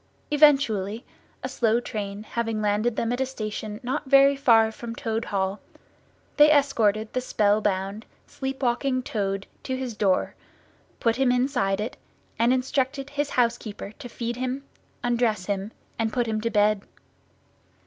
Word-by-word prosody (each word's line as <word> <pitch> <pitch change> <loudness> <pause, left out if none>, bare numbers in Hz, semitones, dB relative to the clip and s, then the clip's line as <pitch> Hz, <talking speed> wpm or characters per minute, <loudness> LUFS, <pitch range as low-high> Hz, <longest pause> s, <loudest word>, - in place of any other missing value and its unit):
Eventually, 250 -8 +3 0.4
a - - -1
slow 230 0 +1
train 205 -3 -5
having 225 -1 -2
landed 215 +2 +1
them 230 +2 0
at 245 - -2
a - - +2
station 215 -3 -5
not 265 +3 -2
very 275 +1 +6
far 225 -5 +4
from 230 +1 -7
Toad 225 -1 -2
Hall, 195 0 -1 0.8
they 295 0 +8
escorted 225 -7 +2
the 255 - 0
spell 210 -3 +2
bound, 195 +1 -2 0.2
sleep 270 0 -5
walking 255 +1 +1
Toad 195 -4 -2 0.2
to 260 -1 -3
his 255 -4 -4
door, 195 -3 +1 0.7
put 230 0 +1
him 265 -2 +3
inside 245 -6 +1
it, 220 +4 -4 0.4
and 235 +2 +4
instructed 265 +2 -1
his 290 0 -1
housekeeper 230 -5 -1
to 250 -4 -8
feed 235 0 -4
him, 255 +2 -3 0.4
undress 235 -5 +1
him, 200 +1 -2 0.3
and 225 -1 0
put 245 0 0
him 220 -1 -2
to 230 - 0
bed. 210 -1 +3
230 Hz, 150 wpm, -25 LUFS, 210-260 Hz, 0.8 s, they